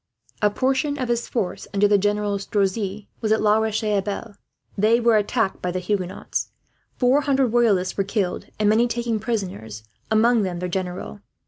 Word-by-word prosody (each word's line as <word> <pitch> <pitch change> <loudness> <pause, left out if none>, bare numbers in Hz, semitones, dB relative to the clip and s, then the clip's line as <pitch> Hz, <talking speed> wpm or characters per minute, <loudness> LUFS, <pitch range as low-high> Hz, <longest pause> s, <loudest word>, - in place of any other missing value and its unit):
A 210 - +4
part 260 +6 +1
of 285 -4 -3
his 235 0 0
force, 205 -7 -3
under 205 +1 +4
General 205 0 +1
Strozzi, 200 0 -1
was 215 -2 0
at 220 - +4
La 210 0 +4
Roche 220 0 -1
Abeille. 205 +1 -2 0.4
They 220 +4 +3
were 235 -1 +4
attacked 210 0 0
by 180 - -1
the 180 - -2
Huguenots. 185 0 -2 0.5
Four 255 +3 +3
hundred 270 -3 +2
Royalists 215 -6 +2
were 195 - +2
killed, 195 -2 -2
and 215 - +1
many 225 +3 +4
taken 235 -2 -1
prisoners, 180 - -4 0.3
among 225 +1 +4
them 185 -3 -2
their 180 +1 -3
general. 180 - -4
210 Hz, 165 wpm, -23 LUFS, 195-235 Hz, 0.5 s, A